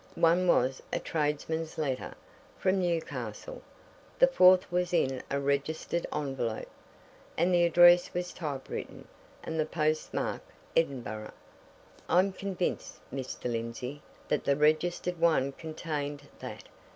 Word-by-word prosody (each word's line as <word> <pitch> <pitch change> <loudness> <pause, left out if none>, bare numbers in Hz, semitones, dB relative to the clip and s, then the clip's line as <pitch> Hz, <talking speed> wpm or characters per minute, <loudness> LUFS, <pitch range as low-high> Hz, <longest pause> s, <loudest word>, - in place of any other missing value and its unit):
One 170 +2 +3
was 130 -5 +3
a - - 0
tradesman's 160 +1 -2
letter 135 -5 -2 0.4
from 190 0 +2
Newcastle. 175 - -3 0.6
The - - +8
fourth 185 - +5
was 180 0 0
in 130 -5 +1
a 140 - 0
registered 140 +4 -1
envelope 135 -6 -2 0.7
and 175 +3 +3
the 175 -1 +5
address 175 +1 +6
was 180 0 -3
typewritten 145 -6 -6 0.4
and 160 0 -3
the 155 - +2
post 155 0 0
mark - - -2 0.3
Edinburgh. 120 -9 -1 0.8
I'm 185 +2 +4
convinced, 190 -2 -3 0.2
Mr. 135 -1 -5
Lindsey, 120 +4 -4 0.3
that 150 - 0
the 140 - +2
registered 160 +4 +1
one 160 -5 +3
contained 145 -2 -5
that! - - -7
155 Hz, 120 wpm, -30 LUFS, 140-175 Hz, 0.8 s, The